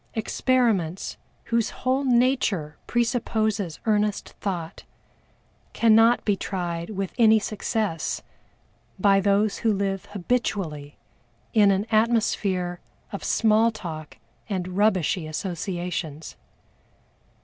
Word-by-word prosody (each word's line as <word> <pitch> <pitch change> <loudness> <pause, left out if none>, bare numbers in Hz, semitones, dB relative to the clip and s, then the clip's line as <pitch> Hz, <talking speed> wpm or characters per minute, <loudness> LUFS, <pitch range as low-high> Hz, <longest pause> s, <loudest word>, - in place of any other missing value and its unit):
Experiments, 220 -6 0 0.3
whose 230 -1 0
whole 260 +2 -1
nature 240 - +1
presupposes 220 - 0
earnest 210 -2 +1
thought, 175 -5 -4 0.9
cannot 225 +1 +4
be 205 - +2
tried 175 -3 -4
with 195 -3 -4
any 220 -1 +7
success 210 -5 -2 0.7
by 195 +1 +4
those 200 +1 +2
who 225 - +2
live 195 -2 -1
habitually 180 -8 -3 0.6
in 210 -3 +5
an 195 +1 +1
atmosphere 210 -5 +1 0.3
of 200 - -6
small 220 +1 +3
talk 160 -8 -7 0.3
and 185 -3 -2
"rubbishy" 190 -5 +1
associations. 175 -2 -4
200 Hz, 95 wpm, -25 LUFS, 180-225 Hz, 0.9 s, any